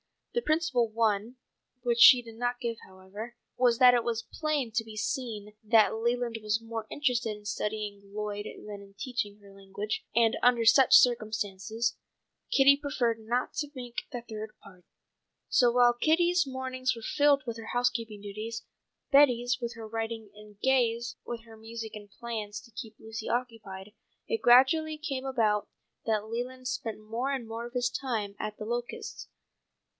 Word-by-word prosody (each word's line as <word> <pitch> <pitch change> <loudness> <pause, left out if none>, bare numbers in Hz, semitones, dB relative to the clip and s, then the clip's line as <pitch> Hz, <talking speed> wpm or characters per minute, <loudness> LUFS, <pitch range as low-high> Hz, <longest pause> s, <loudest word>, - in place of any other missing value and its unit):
The 475 - +1
principal 310 - +1
one, 220 +1 0 0.5
which 240 -1 +1
she 250 -1 +9
did 230 -1 -11
not 245 +1 -2
give 230 -1 -2
however, 195 +5 -9 0.2
was 245 -2 +3
that 250 0 +8
it 240 -1 +2
was 230 -1 -2
plain 300 -6 -1
to 225 +1 0
be 220 -1 -11
seen 215 -2 -3
that 220 0 +4
Leland 235 +1 -1
was 215 +1 0
more 225 -1 -6
interested 245 -7 0
in 210 - -17
studying 210 -1 -3
Lloyd 205 0 -5
than 205 -1 -8
in 195 0 -16
teaching 210 -3 -3
her 200 -1 -16
a - - -15
language, 195 +2 -5
and 230 -1 +4
under 240 -2 +4
such 255 +4 +6
circumstances, 220 -2 +2 0.5
Kitty 280 +1 +6
preferred 255 -6 -1
not 240 +3 -2
to 295 -2 -2
make 245 -2 -6
the 245 -3 -4
third 220 -2 -7
party. 180 -3 -16 0.6
So 245 - +5
while 240 0 +5
Kitty's 345 +6 +3
mornings 260 -1 -2
were 230 - -10
filled 285 +1 +3
with 230 -2 -4
her 225 - -7
housekeeping 230 -4 0
duties, 215 +3 -6 0.5
Betty's 250 -4 +5
with 235 0 -4
her 225 -1 -8
writing 225 -1 -4
and 210 -1 -15
Gay's 240 -3 +1
with 235 -1 -5
her 225 -1 -14
music 225 0 -7
and 205 -1 -10
plans 215 -2 -5
to 235 - -18
keep 220 0 -8
Lucy 220 0 -7
occupied, 215 -5 -4 0.4
it 455 -2 -1
gradually 305 +6 +5
came 275 -4 -4
about 220 -6 +1 0.4
that 215 -2 0
Leland 250 +3 -5
spent 225 -3 -4
more 235 +5 -2
and 265 -4 -2
more 230 +1 -5
of 240 - -15
his 250 -1 +1
time 225 -6 -3
at 215 0 -4
The 215 - -6
Locusts. 240 +2 -5
230 Hz, 170 wpm, -29 LUFS, 215-250 Hz, 0.6 s, she